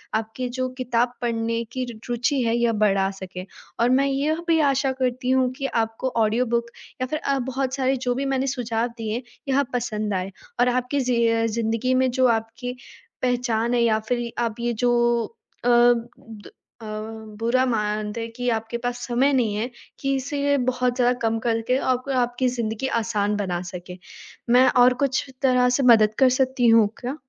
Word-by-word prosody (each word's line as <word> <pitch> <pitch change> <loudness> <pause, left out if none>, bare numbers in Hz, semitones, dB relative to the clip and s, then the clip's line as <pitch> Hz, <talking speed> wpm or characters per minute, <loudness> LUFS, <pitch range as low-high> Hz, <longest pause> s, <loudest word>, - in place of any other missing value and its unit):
आपकी 225 +3 -3
जो 255 0 0
किताब 245 -1 0
पढ़ने 230 -1 -1
की 255 -1 -2
रू 225 - -11
रूचि 250 +3 0
है 230 0 +1
यह 235 -1 +2
बढ़ा 195 -2 +3
सके। 185 -1 -7 0.3
और 235 +1 +3
मैं 265 +2 +3
यह 295 +5 -1
भी 325 -1 +3
आशा 270 0 0
करती 250 0 -1
हूँ 260 -1 +3
कि 275 - -3 0.2
आपको 225 +4 -4 0.2
ऑडियो 230 +4 +1
बुक 235 0 0 0.4
या 255 - 0
फिर 305 +4 -2
अ, 275 -3 0
बहुत 265 +1 -2
सारे 265 0 +1
जो 245 -1 -1
भी 275 +2 -2
मैंने 270 0 0
सुझाव 240 -3 -1
दिए, 225 +2 -3 0.2
यह 275 +1 +2
पसंद 215 -4 -2
आए। 185 +1 -2 0.3
और 245 +1 +4
आपकी 255 +3 0
ज़ि 245 -2 +2
अ, 230 0 +2
ज़िन्दगी 230 +2 0
में 260 - +2
जो 255 0 +3
आपकी 235 +3 -6 0.5
पहचान 245 -2 0
है 240 - +2
या 220 -2 +3
फिर 240 -1 -1
आप 230 -1 -3
ये 235 0 -1
जो 240 - +3 0.7
अ - - +3
द 240 -2 +1 0.3
अ, 220 - -9 0.5
बुरा 245 +3 +2
मानते 210 -2 -1
हैं 230 0 -5
कि 245 0 -3
आपके 225 +1 -2
पास 245 0 -2
समय 255 +3 +2
नहीं 230 -6 +1
है, 220 +4 -2 0.3
कि 275 0 0
इसीलिए 285 +1 0
बहुत 250 -1 0
ज़्यादा 245 -1 +3
कम 225 0 +1
करके 230 +2 0
आप 255 0 -1
आपकी 250 -1 +1
ज़िन्दगी 235 +1 -2
आसान 210 -2 0
बना 180 -3 -2
सके। 180 0 -8 0.6
मैं 255 +1 +6 0.2
और 250 +1 +6
कुछ 265 -1 -1 0.2
तरह 250 -1 +4
से 275 - 0
मदद 220 -4 +6
कर 265 -1 +6
सकती 260 -2 +2
हूँ 225 -2 +6
क्या? 255 +3 -4
245 Hz, 185 wpm, -23 LUFS, 225-255 Hz, 0.7 s, मैं